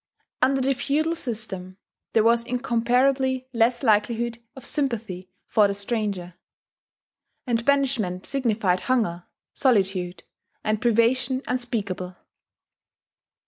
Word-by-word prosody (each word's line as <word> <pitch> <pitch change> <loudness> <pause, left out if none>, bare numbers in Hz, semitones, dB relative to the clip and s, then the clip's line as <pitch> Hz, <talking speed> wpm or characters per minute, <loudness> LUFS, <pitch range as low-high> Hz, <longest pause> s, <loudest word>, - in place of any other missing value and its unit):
Under 270 +1 +3
the 270 +1 +2
feudal 310 +5 0
system 210 - -3 0.4
there 220 - +4
was 235 +1 +4
incomparably 250 +2 +1
less 235 +2 +2
likelihood 230 +1 +1 0.2
of 265 - -10
sympathy 220 -10 -2 0.2
for 210 -2 +4
the 200 - -2
stranger; 200 -4 -3 1.1
and 235 -2 0
banishment 255 -10 +1
signified 220 -9 +1
hunger, 180 -10 0 0.3
solitude, 190 -8 +1 0.4
and 215 0 0
privation 245 +3 +2
unspeakable. 205 -7 -2
235 Hz, 100 wpm, -24 LUFS, 200-255 Hz, 1.1 s, there